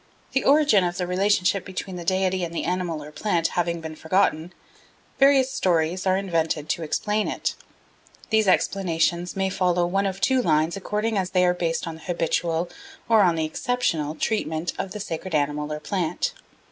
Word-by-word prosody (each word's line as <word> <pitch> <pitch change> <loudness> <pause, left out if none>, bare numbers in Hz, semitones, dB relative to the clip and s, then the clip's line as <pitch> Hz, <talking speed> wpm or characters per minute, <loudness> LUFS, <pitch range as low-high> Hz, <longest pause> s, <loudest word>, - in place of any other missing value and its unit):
The 270 - +1
origin 285 -9 +5
of 175 0 -2
the 180 - -1
relationship 190 +1 +1
between 190 0 -6
the 175 - -6
deity 185 +1 +1
and 170 - -3
the - - -1
animal 175 -3 -2
or 150 - -10
plant 170 -1 0
having 170 -1 -1
been 160 -1 -7
forgotten, 160 0 +1 0.7
various 270 -1 +5
stories 175 -2 0
are 185 0 +3
invented 165 -5 -1
to - - -1
explain 210 +7 -1
it. - - -2 0.8
These 220 -2 +3
explanations 175 -2 +1
may 190 0 0
follow 180 -2 +1
one 195 +3 0
of 190 0 -4
two 260 +4 +3
lines 155 -4 +2
according 210 +2 -1
as 185 -1 -2
they 180 -1 +3
are 180 - +3
based 165 -2 -2
on 165 - -4
the - - -16
habitual 170 0 -1 0.4
or 225 -2 +5
on 175 -4 +4
the 160 -1 0
exceptional 160 - -1
treatment 165 -4 -1
of 195 - -2
the 210 - -6
sacred 175 -2 -4
animal 150 0 -1
or 150 - -3
plant. 175 +1 -2
180 Hz, 180 wpm, -24 LUFS, 165-195 Hz, 0.8 s, origin